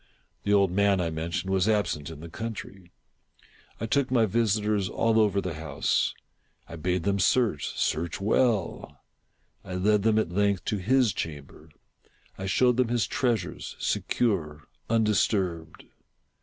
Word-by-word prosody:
The 100 - +1
old 100 -3 +4
man, 100 0 +3
I 85 -2 -1
mentioned, 85 +4 -3
was 95 +2 +2
absent 85 -8 0
in 80 -2 -9
the 85 - -8
country. 100 -2 -7 0.9
I 115 - -2
took 135 +4 +1
my 120 -3 +3
visitors 105 -2 +1
all 115 -1 +2
over 105 -2 +3
the 90 -3 -3
house. 75 -2 -1 0.5
I - - -8
bade 90 +2 -1
them 100 0 0
search 105 - +2
— - - -9
search 85 +2 -1
zvell. 110 -1 0 0.7
I 95 - -6
led 105 +3 +2
them, 110 +1 +2
at 100 -6 0
length, 100 0 +1
to 105 - -1
his 120 +3 +2
chamber. 75 0 -7 0.7
I 95 - -5
showed 125 +5 +3
them 130 -2 +3
his 120 -1 +1
treasures, 115 -9 -2
secure, 80 - -1 0.3
undis 110 -2 +3
turbed. 85 -6 -3
100 Hz, 150 wpm, -27 LUFS, 85-110 Hz, 0.9 s, old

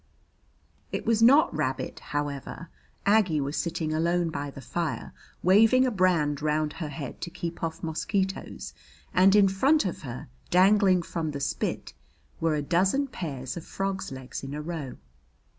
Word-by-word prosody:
It - - -3
was 230 -1 +2
not 265 - +6
rabbit, 140 -4 -2
however. 145 +2 -5 0.4
Aggie 200 -7 +3
was 140 +2 -2
sitting 165 -2 -2
alone 170 +1 +1
by 145 -1 -4
the 135 - -10
fire, 165 +3 -4 0.3
waving 225 +8 +5
a 255 - +1
brand 170 - +2
round 150 0 0
her 160 - -5
head 140 -2 -7
to 170 - -4
keep 170 0 -6
off 165 -1 -3
mosquitoes, 190 +4 -2 0.4
and 190 +2 +5
in 205 -1 +6
front 265 +11 +3
of 180 - -3
her, 125 -4 -7 0.2
dangling 190 0 +5
from 165 -1 -3
the 145 -1 -4
spit, 140 - -3 0.5
were 160 -1 +1
a 150 - -1
dozen 190 - +2
pairs 135 - -5
of 170 - -6
frogs' 195 -2 -3
legs 130 -1 -7
in 135 +1 -5
a 150 - -4
row. 155 -6 -5
170 Hz, 160 wpm, -27 LUFS, 150-195 Hz, 0.5 s, not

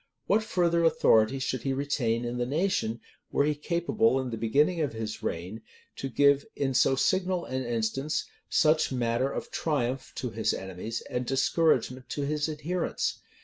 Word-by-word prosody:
What 210 +3 +3
further 175 -5 +1
authority 115 -6 +4
should 130 -2 -2
he 135 - -1
retain 125 -4 0
in 120 +1 -3
the 120 - +1
nation, 140 - 0 0.3
were 140 - +2
he 150 - +2
capable, 170 +4 +1
in 130 -2 -3
the - - -2
beginning 145 +10 +2
of 145 -6 -1
his 110 -1 -5
reign, 90 +7 -4 0.4
to 135 - -4
give, 140 +2 +4
in 135 -2 -1
so 130 +2 +4
signal 185 +4 +1
an 130 0 -3
instance, 120 +5 -1 0.2
such 155 -1 +3
matter 125 +1 0
of - - -5
triumph 135 -4 -1
to 125 -3 -3
his 110 0 0
enemies, 95 +4 -5
and 125 0 -4
discouragement 130 -2 +1
to 145 - -3
his 150 +2 -1
adherents? 155 +4 -2
135 Hz, 165 wpm, -28 LUFS, 120-155 Hz, 0.4 s, authority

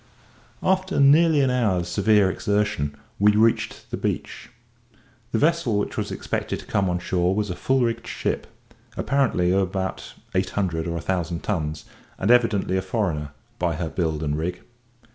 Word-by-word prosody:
After 190 -1 +1
nearly 150 +2 +6
an 130 -2 +2
hour's 100 -9 +1
severe 100 +1 +3
exertion 105 -9 -1 0.2
we 105 +1 +5
reached 110 +2 +1
the - - -2
beach. - - -4 0.8
The - - +1
vessel 155 -8 +2
which 105 - -2
was - - -2
expected - - -3
to - - -11
come 95 -2 0
on 90 - 0
shore 90 0 0
was 105 -2 -1
a - - -4
full 130 +8 +1
rigged 115 -1 -2
ship, - - -2 0.5
apparently 125 -10 +1
of 95 +1 +3
about 95 0 -3 0.2
eight 95 0 +1
hundred 85 -4 0
or 85 0 -2
a - - -4
thousand 85 -1 -2
tons, 80 -7 -2 0.3
and 100 - +1
evidently 110 -6 +3
a - - +1
foreigner, 95 -7 -2 0.3
by 85 -2 0
her 80 0 -3
build 80 -3 -1
and 75 -1 0
rig. 90 +2 -3
95 Hz, 165 wpm, -24 LUFS, 85-115 Hz, 0.8 s, nearly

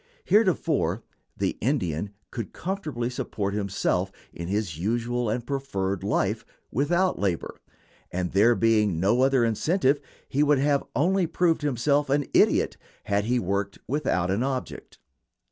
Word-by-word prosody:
Heretofore 160 - +2 0.3
the - - -1
Indian 100 - -1 0.2
could 115 -6 -5
comfortably 160 -10 -3
support 105 -5 -3
himself 95 -2 0 0.2
in 85 - -6
his 95 -5 -2
usual 120 +4 -1
and 120 +2 -2
preferred 100 -9 -2
life - - 0 0.3
without 175 - +1
labor; 95 -5 -2 0.5
and 90 0 -2
there 110 +5 +5
being 105 -7 +2
no 105 +8 +3
other 135 -2 +4
incentive 140 - +1 0.3
he 140 - 0
would 150 -1 +4
have 140 +1 +2
only 180 +6 +2
proved 165 0 +1
himself 145 +1 +1
an 145 +1 +2
idiot - - +3 0.3
had 100 0 0
he 125 +2 +1
worked 100 -1 -1
without 95 -11 0
an 100 +4 0
object. 130 -1 -4
120 Hz, 135 wpm, -26 LUFS, 100-145 Hz, 0.5 s, there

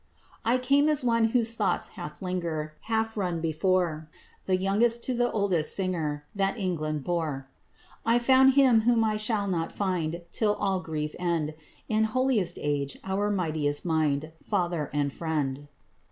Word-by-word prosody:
"I 235 +3 +3
came 280 +4 +3
as 300 -4 +2
one 230 -2 +3
whose 230 0 +2
thoughts 200 -6 -1
half 150 +5 -8
linger, 165 -4 -3
Half 225 0 -1
run 180 -4 -1
before; 160 -1 0 0.4
The 185 -1 +3
youngest 225 +5 +2
to 255 - 0
the 245 0 +1
oldest 190 -7 +1
singer 160 -6 -2
That 195 +3 0
England 155 -7 -2
bore. 155 -6 -2 0.6
I 230 +1 +3
found 260 +2 +5
him 260 -5 +5
whom 230 0 +3
I 215 -1 +1
shall 215 -1 0
not 165 -3 -1
find 175 -4 -2
Till 210 -2 +1
all 195 -1 0
grief 155 -3 -4
end; 165 -4 -1 0.3
In 220 0 +2
holiest 220 -6 +1
age 145 -2 -2
our 195 +2 -1
mightiest 155 -7 -1
mind, 155 -2 0
Father 175 -7 -1
and 145 -1 -1
friend." 145 -4 -2
185 Hz, 155 wpm, -27 LUFS, 155-225 Hz, 0.6 s, found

